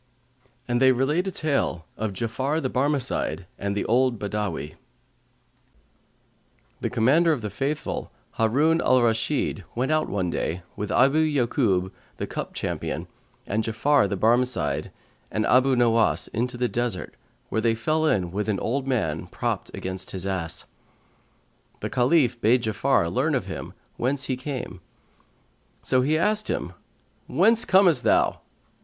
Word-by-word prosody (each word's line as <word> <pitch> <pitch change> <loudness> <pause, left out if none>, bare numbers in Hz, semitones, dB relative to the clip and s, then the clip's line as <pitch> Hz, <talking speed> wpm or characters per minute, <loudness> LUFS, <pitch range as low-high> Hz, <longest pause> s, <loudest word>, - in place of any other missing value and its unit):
And 120 0 0
they 130 0 +7
relate 145 +9 +1
a - - -1
tale 140 - -1
of 110 -2 -3
JA'AFAR 130 - -1
THE 130 - -1
BARMECIDE 130 - 0
AND 100 0 -2
THE - - -1
OLD 125 +1 +2
BADAWL 100 -7 -3 2.1
The - - -2
Commander 135 +8 +3
of 145 -6 -1
the 105 - -3
Faithful, 140 +9 -3 0.3
Harun 145 +9 +3
al 130 - +4
Rashid, 115 -1 0
went 130 +5 0
out 155 0 +1
one 95 -4 -1
day, 85 +2 -3
with 105 0 -4
Abu 135 +4 +4
Ya'Kϊb 120 -11 +1 0.3
the - - -3
cup - - -6
companion[FN#140] - - -3 0.4
and 110 +2 -1
Ja'afar 115 +1 +2
the 100 - -2
Barmecide 120 +4 +1 0.4
and 110 - -1
Abu 130 +1 +4
Nowas, 115 -2 +2
into 120 +2 -2
the 125 0 +1
desert, 115 -3 -2 0.4
where 110 - 0
they 115 0 +2
fell 155 +7 0
in 90 - +1
with 105 +3 -2
an 100 - 0
old 135 +3 -2
man, 90 - -1
propt - - -3
against 95 0 -5
his 95 -1 -5
ass. 85 -5 -2 1.2
The - - -4
Caliph 125 -2 +2
bade 120 +3 +3
Ja'afar 110 -5 +1
learn - - +1
of - - -1
him - - -7 0.2
whence 135 +3 0
he 130 - -1
came; 125 -8 -6 1.0
so 130 - +3
he 150 +4 +2
asked 210 +5 +1
him, - - -3 0.5
"Whence 230 0 +3
comest 185 -4 +5
thou?" - - +2
120 Hz, 145 wpm, -25 LUFS, 105-140 Hz, 2.1 s, they